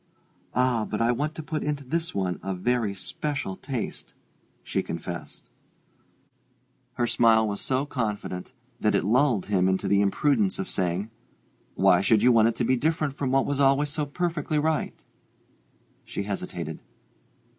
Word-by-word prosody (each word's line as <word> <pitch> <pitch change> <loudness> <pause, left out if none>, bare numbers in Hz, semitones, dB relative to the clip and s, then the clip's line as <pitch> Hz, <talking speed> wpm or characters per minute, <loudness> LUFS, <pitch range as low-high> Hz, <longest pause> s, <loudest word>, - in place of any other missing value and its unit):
"Ah, 125 -3 +2
but 105 - -2
I 115 +1 +3
want 150 +6 -2
to 160 - -6
put 155 0 -3
into 145 -1 -2
this 165 +5 -2
one 95 -2 -1
a 95 -1 -3
very 110 +1 0
special 100 +3 -3
taste," 130 +2 -5 0.5
she - - -1
confessed. 85 +1 -7 1.5
Her 120 - 0
smile 115 -2 +4
was 100 -1 -2
so 130 +1 0
confident, 105 -9 -3
so - - -26
reassuring, - - -39
that - - +1
it - - +2
lulled 120 -1 +3
him 95 -2 +2
into 95 0 0
the 100 0 +4
imprudence 105 0 +2
of 95 - -3
saying, 95 +4 -1 0.6
"Why - - +5
should 110 -1 +3
you 125 - +6
want 115 -2 +5
it 115 - 0
to 120 - 0
be 130 - +3
different 155 +1 0
from 140 -2 -2
what 135 +1 +3
was 145 -1 -1
always 140 +1 +3
so 145 0 -2
perfectly 160 -1 -1
right?" 155 +1 -1 1.0
She - - -4
hesitated. 100 -1 -5
120 Hz, 165 wpm, -26 LUFS, 100-145 Hz, 1.5 s, you